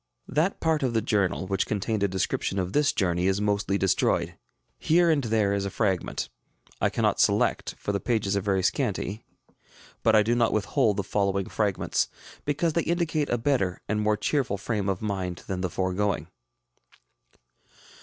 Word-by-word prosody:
That 160 Hz, +8 st, 0 dB
part 160 Hz, -2 st, +1 dB
of 125 Hz, -4 st, 0 dB
the 115 Hz, -, +3 dB
journal 100 Hz, -5 st, 0 dB
which 95 Hz, 0 st, -1 dB
contained 105 Hz, +1 st, -1 dB
a 100 Hz, -, +3 dB
description 95 Hz, +1 st, -1 dB
of 95 Hz, -1 st, -2 dB
this 145 Hz, 0 st, +3 dB
journey 90 Hz, -2 st, 0 dB
is 95 Hz, +1 st, +1 dB
mostly 100 Hz, -1 st, 0 dB
destroyed. 95 Hz, -2 st, +1 dB, 0.4 s
Here 170 Hz, +1 st, +4 dB
and 145 Hz, -3 st, +1 dB
there 110 Hz, -3 st, +2 dB
is 100 Hz, -1 st, 0 dB
a 100 Hz, -, -2 dB
fragment. 95 Hz, -4 st, -1 dB, 0.5 s
I -, -, +3 dB
cannot -, -, 0 dB
select, -, -, +2 dB
for -, -, -3 dB
the 100 Hz, -, -1 dB
pages 105 Hz, -4 st, 0 dB
are 100 Hz, -, +1 dB
very 95 Hz, -1 st, 0 dB
scanty; 105 Hz, -3 st, -1 dB, 0.8 s
but 110 Hz, -1 st, +4 dB
I 105 Hz, -, +6 dB
do 115 Hz, +3 st, +1 dB
not 120 Hz, -1 st, +2 dB
withhold 105 Hz, 0 st, +1 dB
the 100 Hz, -, 0 dB
following 100 Hz, -1 st, 0 dB
fragments, 100 Hz, -4 st, 0 dB, 0.4 s
because 150 Hz, +3 st, 0 dB
they 170 Hz, -, +2 dB
indicate 165 Hz, -4 st, 0 dB
a 120 Hz, -, +1 dB
better 115 Hz, -8 st, 0 dB
and 105 Hz, 0 st, 0 dB
more 105 Hz, 0 st, +2 dB
cheerful 130 Hz, -8 st, 0 dB
frame 100 Hz, 0 st, -2 dB
of 95 Hz, +1 st, -2 dB
mind 95 Hz, -4 st, -3 dB
than 95 Hz, -1 st, -3 dB
the 90 Hz, -, -1 dB
foregoing. 95 Hz, -1 st, -1 dB
105 Hz, 175 wpm, -26 LUFS, 95-120 Hz, 0.8 s, I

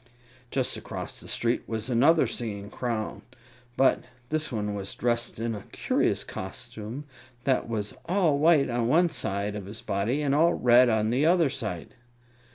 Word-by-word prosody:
Just 130 Hz, -1 st, 0 dB
across -, -, -6 dB
the -, -, -9 dB
street 120 Hz, +1 st, 0 dB
was 110 Hz, 0 st, -3 dB
another 135 Hz, +7 st, +4 dB
singing 105 Hz, -4 st, -4 dB
Clown; 115 Hz, -3 st, -3 dB, 0.6 s
but 135 Hz, -, +4 dB, 0.3 s
this 155 Hz, -1 st, -1 dB
one 105 Hz, -3 st, -2 dB
was 100 Hz, -1 st, -4 dB
dressed 120 Hz, -1 st, -1 dB
in 115 Hz, 0 st, -1 dB
a 105 Hz, -, -8 dB
curious -, -, 0 dB
costume 110 Hz, +6 st, -7 dB, 0.4 s
that 130 Hz, -3 st, +1 dB
was 105 Hz, -2 st, -3 dB
all 170 Hz, -5 st, +2 dB
white 155 Hz, -2 st, +5 dB
on 120 Hz, -1 st, 0 dB
one 170 Hz, +7 st, +4 dB
side 105 Hz, -7 st, -2 dB
of 100 Hz, -2 st, -6 dB
his 105 Hz, +2 st, -7 dB
body 115 Hz, +10 st, -1 dB
and 140 Hz, -1 st, +1 dB
all 165 Hz, +4 st, +4 dB
red 125 Hz, 0 st, +5 dB
on 110 Hz, -1 st, +1 dB
the 135 Hz, +6 st, +2 dB
other 170 Hz, -5 st, +4 dB
side. 95 Hz, -8 st, -4 dB
120 Hz, 165 wpm, -27 LUFS, 105-140 Hz, 0.6 s, white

